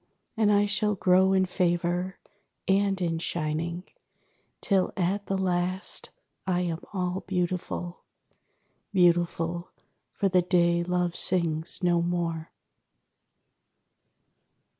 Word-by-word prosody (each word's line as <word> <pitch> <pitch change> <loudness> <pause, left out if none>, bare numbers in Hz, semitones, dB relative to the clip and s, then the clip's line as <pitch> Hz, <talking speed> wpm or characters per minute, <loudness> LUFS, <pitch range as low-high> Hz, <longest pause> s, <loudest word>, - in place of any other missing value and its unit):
And 215 -2 +3
I 205 0 +4
shall 210 0 +1
grow 185 0 +4
in 190 -1 +3
favour 180 0 -1 0.5
and 195 0 +2
in 165 -2 -1
shining, 165 +1 -2 0.8
Till 195 -3 +1
at 195 +3 -1
the 195 - 0
last 185 0 -2 0.4
I 180 -1 +1
am 170 -2 -2
all 185 -1 -2
beautiful; 180 -1 -3 0.9
Beautiful, 175 -2 +1 0.4
for 200 - 0
the 180 -1 +3
day 170 -1 +2
Love 180 -1 -1
sings 170 0 +2
no 175 -1 +3
more. 170 -2 -2
180 Hz, 100 wpm, -27 LUFS, 170-190 Hz, 0.9 s, I